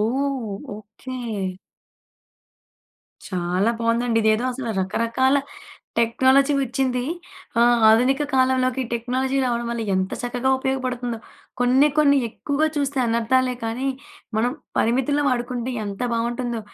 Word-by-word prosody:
ఓహ్! 250 -2 -1 0.2
Okay. 215 +5 -9 2.1
చాలా 185 +3 0
బావుందండి. 230 0 +1
ఇదేదో 220 +2 +2
అసలు 245 -2 -4
రకరకాల 230 +7 +1 0.6
టెక్నాలజీ 260 +5 +4
వచ్చింది. 255 -1 -1 0.6
ఆహ్, 240 0 +5
ఆధునిక 250 +6 +4
కాలంలోకి 260 0 +2
టెక్నాలజీ 255 +3 -1
రావడం 240 -1 -1
వల్ల 235 -1 -2
ఎంత 190 0 -1
చక్కగా 245 +2 -1
ఉపయోగపడతుందో. 255 -3 -2 0.4
కొన్ని 260 +4 +5
కొన్ని 285 -2 +5
ఎక్కువగా 285 +6 -1
చూస్తే 285 -1 -1
అనర్ధాలే 250 +3 +1
కానీ 245 +4 -2 0.5
మనం 240 +3 +1 0.3
పరిమితుల్లో 265 +5 +2
వాడుకుంటే 245 0 -2
ఎంత 200 -1 -6
బావుంటుందో. 235 0 -2
245 Hz, 105 wpm, -23 LUFS, 230-265 Hz, 2.1 s, ఆహ్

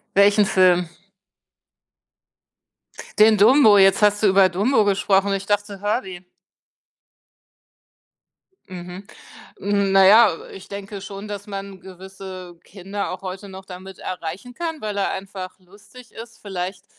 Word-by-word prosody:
Welchen 205 +1 +4
Film? 180 -3 +2 2.3
Den 215 0 +6
„Dumbo“. 220 0 +6
Jetzt 195 +1 +4
hast 210 +1 +2
du - - +5
über 190 0 +5
“Dumbo“ 210 +5 +1
gesprochen. 195 0 +1
Ich 195 0 -4
dachte, 205 -1 -2
“Herbie“. 195 -4 -3 2.5
Mhm, 180 +1 -9 0.6
naja, 200 +1 +4 0.2
äh, - - -13
ich 190 - -12
denke 200 0 -8
schon, 200 +1 -9
dass 205 -1 -8
man 195 -1 -8
gewisse 185 -1 -11
Kinder 195 +1 -6
auch 185 - -7
heute 190 +1 -8
noch 190 0 -11
damit 185 0 -11
erreichen 185 +7 -7
kann, 325 +2 -5
weil 210 -1 -5
er 200 - 0
einfach 190 -1 -8
lustig 205 +7 -18
ist. 230 0 -12
Vielleicht 185 -1 -6
195 Hz, 125 wpm, -21 LUFS, 190-205 Hz, 2.5 s, Den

